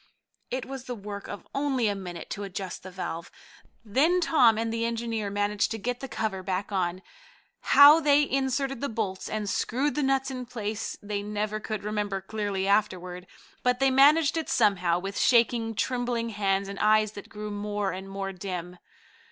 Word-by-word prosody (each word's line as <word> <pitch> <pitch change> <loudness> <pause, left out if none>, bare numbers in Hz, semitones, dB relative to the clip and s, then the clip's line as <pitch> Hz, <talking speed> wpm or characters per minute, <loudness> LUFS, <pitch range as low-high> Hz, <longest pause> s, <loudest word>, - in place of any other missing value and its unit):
It 255 0 -3
was 265 -1 -7
the 250 - -4
work 200 -1 -7
of - - -8
only 270 -4 +1
a 205 - +1
minute 180 -4 -7
to 205 - -4
adjust 190 -2 -5
the 190 - -9
valve. 180 -2 -5 0.6
Then 295 - +3
Tom 255 -10 +4
and 225 0 -1
the 230 0 -1
engineer 230 -2 -2
managed 205 0 0
to 225 - -3
get 245 +3 -3
the 270 - -6
cover 220 -5 -3
back 190 +2 -3
on. 185 -1 -1 0.6
How 290 +3 +8
they 295 -1 +4
inserted 270 -1 -1
the 280 - -1
bolts 210 -4 -3
and 215 -1 -3
screwed 265 +8 0
the 300 - -1
nuts 270 -1 +1
in 255 -2 -6
place 220 -3 -4
they 205 0 -3
never 210 +1 -2
could 215 -1 -5
remember 210 -2 -2
clearly 195 -1 -3
afterward, 185 -3 0 0.3
but 250 0 +1
they 270 0 +4
managed 290 +4 +5
it 320 - -2
somehow, 185 -6 +3
with 195 +2 -4
shaking, 230 -2 +3
trembling 245 0 -1
hands 200 -2 0
and 200 0 -7
eyes 215 0 +4
that 205 -2 -10
grew 210 0 -6
more 205 -1 -2
and 190 +1 -7
more 195 0 -4
dim. 180 -1 -6
215 Hz, 180 wpm, -27 LUFS, 195-250 Hz, 0.6 s, How